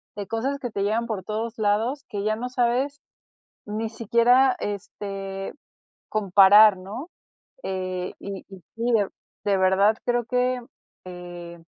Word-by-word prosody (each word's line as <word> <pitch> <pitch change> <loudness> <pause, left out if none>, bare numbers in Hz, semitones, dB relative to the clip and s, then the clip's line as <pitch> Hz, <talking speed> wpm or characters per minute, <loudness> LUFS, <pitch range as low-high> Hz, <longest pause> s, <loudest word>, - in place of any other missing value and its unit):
de 200 -1 -5
cosas 245 +7 -1
que 245 - -4
te 200 - -3
llegan 220 +3 0
por 210 -4 -3
todos 220 +3 -4
lados, 220 +6 0
que 200 -1 -3
ya 215 +1 +1
no 245 +2 -3
sabes 255 +3 0 0.7
ni 220 +2 -3
siquiera, 240 +3 +3
este, 195 -1 -5 0.6
comparar, 205 0 +7
¿no? 210 - -8 0.6
eh, 185 -1 -3
y 195 -1 -7
y 190 -2 -12 0.2
sí, 235 +1 0
de 205 -4 +3 0.4
de 200 -1 +3
verdad 190 +3 +4
creo 240 -1 +1
que 250 +1 +1 0.5
eh, 175 -1 -9
215 Hz, 140 wpm, -25 LUFS, 195-235 Hz, 0.7 s, comparar